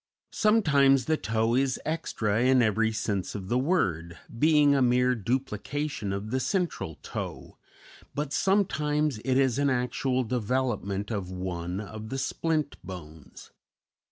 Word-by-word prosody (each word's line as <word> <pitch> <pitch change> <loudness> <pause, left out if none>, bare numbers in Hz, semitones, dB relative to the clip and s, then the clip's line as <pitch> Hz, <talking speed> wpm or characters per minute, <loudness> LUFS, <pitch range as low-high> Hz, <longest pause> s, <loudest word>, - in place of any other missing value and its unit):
Sometimes 140 - +4
the 160 - +2
toe 115 -4 0
is 130 +1 +1
extra 115 -9 -1
in 130 -1 +5
every 110 +1 +2
sense 105 -3 -2
of 95 -2 -6
the 125 - +2
word, 85 - 0 0.2
being 150 -1 +5
a 140 - +2
mere 125 0 +3
duplication 125 +1 -2
of 100 +2 -4
the 130 - +1
central 130 - -2
toe; - - -6 0.6
but 145 0 -2
sometimes 150 - +1
it 130 -1 +1
is 135 -1 +2
an 140 0 +3
actual 125 0 0
development 115 -4 -1
of 100 -5 -3
one 90 -1 -4
of 110 +1 -7
the 135 - -3
splint 155 +1 -1
bones. 80 -5 -11
125 Hz, 135 wpm, -27 LUFS, 105-140 Hz, 0.6 s, in